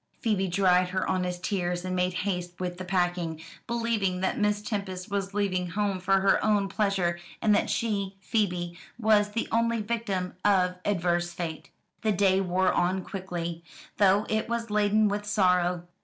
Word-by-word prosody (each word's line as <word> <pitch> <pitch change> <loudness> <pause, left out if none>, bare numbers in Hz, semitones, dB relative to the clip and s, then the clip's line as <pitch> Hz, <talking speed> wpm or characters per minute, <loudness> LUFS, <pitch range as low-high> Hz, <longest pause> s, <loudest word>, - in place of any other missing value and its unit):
Phoebe 205 -5 +1
dried 180 0 +3
her 185 +1 -1
honest 180 -1 -1
tears, 180 -3 -1
and 185 0 -2
made 180 0 +1
haste 180 -3 -3
with 180 -1 -4
the - - -4
packing, 175 -3 -1 0.3
believing 230 -6 0
that 190 - 0
Miss 210 0 +1
Tempest 200 -3 -4
was 200 0 -2
leaving 185 -3 0
home 200 +1 -1
for 190 +1 +2
her 195 0 +3
own 210 -2 +2
pleasure, 190 -5 0 0.2
and 215 - +3
that - - +2
she, 200 -4 -1
Phoebe, 180 -5 -1 0.2
was 215 -2 +3
the 230 - -1
only 230 0 +2
victim 205 -4 -2
of 185 -3 +3
adverse 175 -3 0
fate. 165 -2 -5 0.3
The 220 -2 +2
day 190 0 +3
wore 185 0 +1
on 185 +1 +1
quickly, 170 -3 -5 0.3
though 200 +1 +4
it 220 +1 -1
was 230 -2 -2
laden 210 +1 +3
with 205 0 -1
sorrow. 180 -4 +2
190 Hz, 165 wpm, -27 LUFS, 180-210 Hz, 0.3 s, though